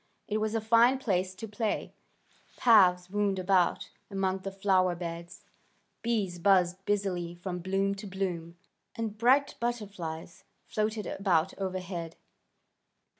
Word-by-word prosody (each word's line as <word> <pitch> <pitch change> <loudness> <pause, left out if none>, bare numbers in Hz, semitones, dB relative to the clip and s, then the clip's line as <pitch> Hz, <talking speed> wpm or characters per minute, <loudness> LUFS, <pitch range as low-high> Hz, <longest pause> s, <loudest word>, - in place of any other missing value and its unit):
It 215 +1 -1
was 215 +1 -1
a 225 - +1
fine 230 +4 +5
place 190 -7 -1
to 225 - -7
play. 210 +1 -2 0.6
Paths 185 -6 +5
wound 205 -1 +1
about 185 -1 +1 0.2
among 195 -1 -1
the 195 +1 -5
flower 190 -2 +2
beds. 170 0 -7 0.6
Bees 205 -7 -1
buzzed 185 0 +3
busily 185 -4 -1
from 180 0 -5
bloom 195 +2 0
to 200 +1 -8
bloom, 175 -3 -4 0.4
and 225 -2 -3
bright 260 +6 +3
butterflies 190 -7 -4 0.2
floated 215 0 -2
about 185 -2 +1
overhead. 185 -3 -4
195 Hz, 125 wpm, -29 LUFS, 180-210 Hz, 0.6 s, fine